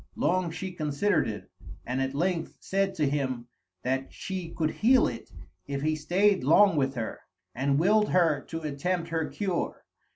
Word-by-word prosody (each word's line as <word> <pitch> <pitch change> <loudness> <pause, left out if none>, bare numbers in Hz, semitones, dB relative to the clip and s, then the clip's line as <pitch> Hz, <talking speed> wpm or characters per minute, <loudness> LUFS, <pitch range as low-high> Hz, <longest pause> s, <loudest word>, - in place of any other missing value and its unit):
Long 185 -1 +1
she 185 +3 -5
considered 165 +4 +1
it, 105 -1 -6 0.4
and 130 +2 -1
at 135 +1 -2
length 170 +1 -1
said 195 0 0
to 150 -3 +1
him 130 -4 -1 0.4
that 130 +1 -1
she 185 -3 -5
could 155 -2 -1
heal 250 +4 +4
it - - -7 0.4
if 140 0 -3
he 155 0 +1
stayed 185 +5 +2
long 165 +6 +6
with 135 -2 +1
her, 115 -3 -4 0.3
and 140 +2 +1
willed 210 +6 +3
her 165 -6 +3
to 165 0 -5
attempt 165 +4 -2
her 160 -1 -1
cure. 190 -4 -3
160 Hz, 165 wpm, -28 LUFS, 140-185 Hz, 0.4 s, long